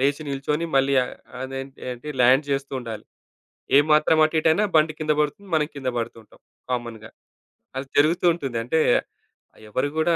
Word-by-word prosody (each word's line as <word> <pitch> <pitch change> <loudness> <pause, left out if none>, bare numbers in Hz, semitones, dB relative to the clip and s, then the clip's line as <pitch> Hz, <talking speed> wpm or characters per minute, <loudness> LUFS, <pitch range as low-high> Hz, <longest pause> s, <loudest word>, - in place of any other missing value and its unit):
లేచి, 140 +3 +1
నిల్చొని 150 +4 -2
మళ్ళీ 135 +1 +3
అ - - -6 0.4
అదేంటి 135 0 -7
ఏంటి, 125 +4 -8
ల్యాండ్ 130 +4 +5
జేస్తూ 140 0 -2
ఉండాలి. 110 -3 -7 0.7
ఏ - - +9
మాత్రం 155 +1 +4
అటు, 155 - -1
ఇటైయినా 160 +6 +3
బండి 155 0 +4
కింద 155 0 +1
పడుతుంది. 195 +7 -2
మనం 155 -1 +2
కింద 135 -2 -4
పడుతూ 115 0 -4
ఉంటాం 110 - -23 0.3
కామన్‌గా. 115 -3 -4 0.7
అది 135 0 -4
జరుగుతూ 160 +5 +3
ఉంటుంది. 135 -8 -4
అంటే, 140 +8 0 0.9
ఎవరు 130 +6 0
కూడా 165 +1 +3
140 Hz, 160 wpm, -23 LUFS, 125-155 Hz, 0.9 s, ఏ